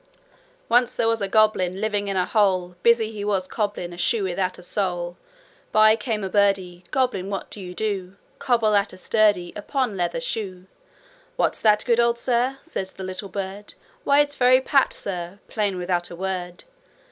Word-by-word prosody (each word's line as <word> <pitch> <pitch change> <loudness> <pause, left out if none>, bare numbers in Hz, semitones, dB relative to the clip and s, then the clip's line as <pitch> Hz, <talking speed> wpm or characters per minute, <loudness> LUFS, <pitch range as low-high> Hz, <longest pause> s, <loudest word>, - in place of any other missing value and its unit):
'Once 245 +1 +3
there 230 - +1
was 225 -1 +1
a 200 - +1
goblin 195 -3 +2
Living 205 -1 -1
in 195 -1 -1
a 180 - +2
hole; 185 -4 +1
Busy 235 -1 +3
he 210 -2 -6
was 195 -3 0
cobblin' 205 -5 -3
A - - -10
shoe 210 +4 +1
without 185 0 -1
a 180 - -12
sole. 175 -2 -2 0.6
'By 215 0 +6
came 215 -1 -3
a - - -1
birdie: 190 -3 +1
"Goblin, 250 -8 0
what 195 -1 -5
do 205 - -7
you 180 -1 -8
do?" 195 -3 -3 0.2
"Cobble 230 -4 +2
at 200 0 +1
a - - -11
sturdie 205 -3 +2
Upper 260 +6 -1
leather 190 -2 -2
shoe." 195 -7 -4 0.7
'"What's - - 0
the 210 -1 +5
good 235 -1 +2
o' 235 0 +4
that, - - -18
Sir?" 250 +2 0
Said 260 - -4
the 190 - -6
little 185 +2 -6
bird. 195 +1 -6 0.3
"Why 285 +1 +5
it's 290 0 -1
very 255 -1 +5
Pat, 275 0 +2
Sir 180 -1 -5
Plain 205 -4 -1
without 175 -1 -1
a 175 - -8
word. 180 -1 -4
200 Hz, 185 wpm, -23 LUFS, 185-225 Hz, 0.7 s, By